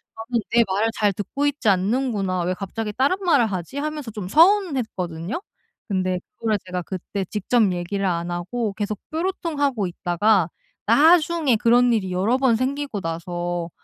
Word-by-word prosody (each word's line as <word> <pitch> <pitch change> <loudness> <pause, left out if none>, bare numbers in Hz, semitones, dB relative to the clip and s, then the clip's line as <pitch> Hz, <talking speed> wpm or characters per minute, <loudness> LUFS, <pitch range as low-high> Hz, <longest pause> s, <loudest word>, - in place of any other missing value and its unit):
저는 225 +1 -2
'내 235 0 +6
말을 200 +4 +1
잘 210 -1 +2
듣고 240 +9 -3
있지 285 -5 -1
않는구나. 200 -1 0
왜 180 +2 0
갑자기 210 +3 -5
다른 275 - +2
말을 280 -10 +4
하지?' 185 - -5
하면서 300 -4 -4
좀 205 -4 -6
서운했거든요. 255 - +2 0.5
근데 185 -2 0 0.2
그거를 220 -2 0
제가 180 -1 -3
그때 190 +2 -5
직접 210 +3 +1
얘기를 180 +3 -2
안 170 -1 -1
하고 200 +5 -3
계속 210 +1 -3
뾰루통하고 310 - -1
있다가 175 +1 +1 0.4
나중에 315 -4 +4
그런 240 +2 +4
일이 200 -5 0
여러 200 +8 +2
번 265 -3 +3
생기고 265 -2 -2
나서 175 +1 -3
215 Hz, 330 characters per minute, -23 LUFS, 185-265 Hz, 0.5 s, 내